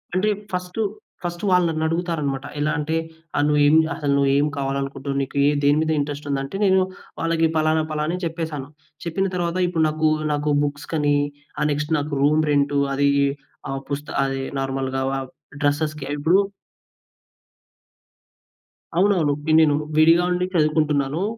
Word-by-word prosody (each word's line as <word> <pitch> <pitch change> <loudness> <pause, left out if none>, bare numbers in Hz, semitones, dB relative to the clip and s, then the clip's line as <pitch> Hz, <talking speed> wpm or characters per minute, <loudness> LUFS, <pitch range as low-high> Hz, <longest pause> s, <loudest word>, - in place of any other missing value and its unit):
అంటే 205 +3 +2 0.2
first, 180 +4 -3 0.4
first 175 +2 -4
వాళ్ళు 180 -2 +4
నన్నడుగుతారన్నమాట. 160 -4 -1
ఎలా 150 +1 +1
అంటే, 155 +2 -1 0.4
ఆహ్, 145 - +3
నువ్వు 150 0 +3
ఏం 150 - +5 0.2
అసలు 145 -2 0
నువ్వేమి 140 +2 +3
కావాలనుకుంటున్నావు. 140 0 -3
నీకు 140 +1 -4 0.2
దేని 145 +1 +4
మీద 160 0 0
ఇంట్రెస్ట్ 145 0 -4
ఉంది. 140 - 0
అంటే 140 +8 -5
నేను 190 0 +4 0.4
వాళ్ళకి 165 0 +2
ఫలానా 155 0 +2
ఫలానా 155 +2 -1
అని 180 - -9
చెప్పేసాను. 160 -4 -4 0.4
చెప్పిన 190 +4 0
తరువాత 175 0 -1
ఇప్పుడు 165 -2 +1
నాకు, 155 0 +1 0.2
నాకు 145 0 0
బుక్స్ 145 0 -4
కని 145 -2 +2 0.4
ఆహ్, 150 - +2
నెక్స్ట్ 150 +2 -1
నాకు 145 0 -4
రూమ్ 155 +2 +4
రెంటు 145 0 +2 0.2
అది 140 0 +3 0.6
ఆహ్, 135 0 -3
పుస్త 145 +1 -4 0.2
అది 135 0 -2 0.2
నార్మల్‌గా 135 0 -2 0.6
డ్రెసెస్‌కి 150 0 0
ఇప్పుడు 165 +6 +3 2.6
అవునవును. 180 -6 +3
ఇప్పుడు 155 +1 +1
నేను 150 -2 +4 0.2
విడిగా 165 +3 +6
ఉండి 180 0 +1
చదువుకుంటున్నాను. 155 0 +1
150 Hz, 140 wpm, -22 LUFS, 145-165 Hz, 2.6 s, విడిగా